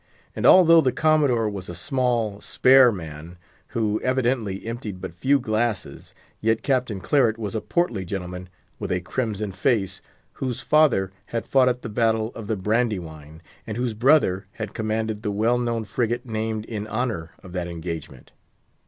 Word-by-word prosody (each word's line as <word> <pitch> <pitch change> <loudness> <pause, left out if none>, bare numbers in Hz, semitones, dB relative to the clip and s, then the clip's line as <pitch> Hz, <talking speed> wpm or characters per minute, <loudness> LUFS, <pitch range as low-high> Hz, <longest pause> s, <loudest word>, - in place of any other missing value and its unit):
And - - +2
although 165 -3 +8
the 130 -4 +2
Commodore 145 -8 +2
was 100 -3 -5
a 90 - -6
small, 115 - -1
spare 130 -1 +5
man, 80 -2 -8 0.3
who 110 -2 -1
evidently 120 -6 0
emptied 115 -5 -5
but 85 - -7
few 135 +11 +2
glasses, 110 -3 -2 0.2
yet 110 +1 +1
Captain 125 -7 0
Claret 115 0 +2
was 105 -3 -4
a 110 - -2
portly 120 - -1
gentleman, 90 -1 -6 0.3
with - - -4
a 90 - +1
crimson 105 +1 -3
face, 95 0 0 0.4
whose 130 -3 -2
father 140 -12 +3 0.2
had 115 -1 -3
fought 130 -2 +4
at 125 0 -3
the - - -4
battle 110 0 +1
of 110 -3 -8
the 110 -1 -1
Brandywine, 90 -8 -2 0.2
and 110 0 -4
whose 120 -2 -1
brother 110 -5 +3
had 110 -2 -6
commanded 110 -1 -2
the 105 - -2
well 110 +4 +1
known 120 -2 -1
frigate 120 +2 -2
named 110 -1 -3
in 105 -2 -5
honour 110 -10 -3
of 95 - -11
that 90 -1 -3
engagement. 80 -5 -7
110 Hz, 160 wpm, -24 LUFS, 95-125 Hz, 0.4 s, although